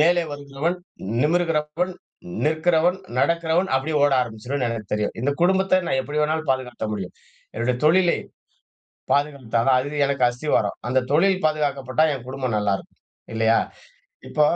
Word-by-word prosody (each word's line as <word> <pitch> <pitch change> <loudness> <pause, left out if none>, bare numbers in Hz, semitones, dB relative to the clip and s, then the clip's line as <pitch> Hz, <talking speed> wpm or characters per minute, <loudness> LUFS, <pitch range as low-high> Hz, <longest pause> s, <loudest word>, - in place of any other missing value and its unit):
மேலே 175 +2 +4
வருகிறவன், 145 +4 -3 0.5
நிமிரகிறவன், 165 +1 0 0.5
நிற்கிறவன், 160 +3 +2 0.2
நடக்கிறவன் 170 +2 +2
அப்டியே 150 +3 0
ஓட 145 -1 +4
ஆரம்பிச்சுிருவன்னு 125 +2 -2
எனக்கு 110 -3 -5
தெரியும். 105 0 -1
இந்த 140 - +2
குடும்பத்த 190 +1 +3
நான் 130 - +1
எப்படி 145 +3 -2
வேணாலும் 155 0 0
பாதுகாத்த 130 -3 -4
முடியும். 95 -4 -5 0.4
என்னுடைய 120 +2 0
தொழிலை. 175 +3 +4 0.9
பாதுகாத்தற 140 -5 0 0.2
தான். 130 - +5
அது 145 +3 -2
எனக்கு 140 -2 0
அஸ்தி 125 +5 -7
வரும். 100 -2 -1
அந்த 130 +1 +3
தொழில் 190 +3 +3
பாதுகாக்கப்பட்டா 145 -2 +1
என் 125 -2 -10
குடும்பம் 130 -3 -2
நல்லாருக்கும். 100 -2 -2 0.3
இல்லையா? 115 0 +3 0.7
இப்ப 150 - +1
145 Hz, 135 wpm, -23 LUFS, 125-160 Hz, 0.9 s, தான்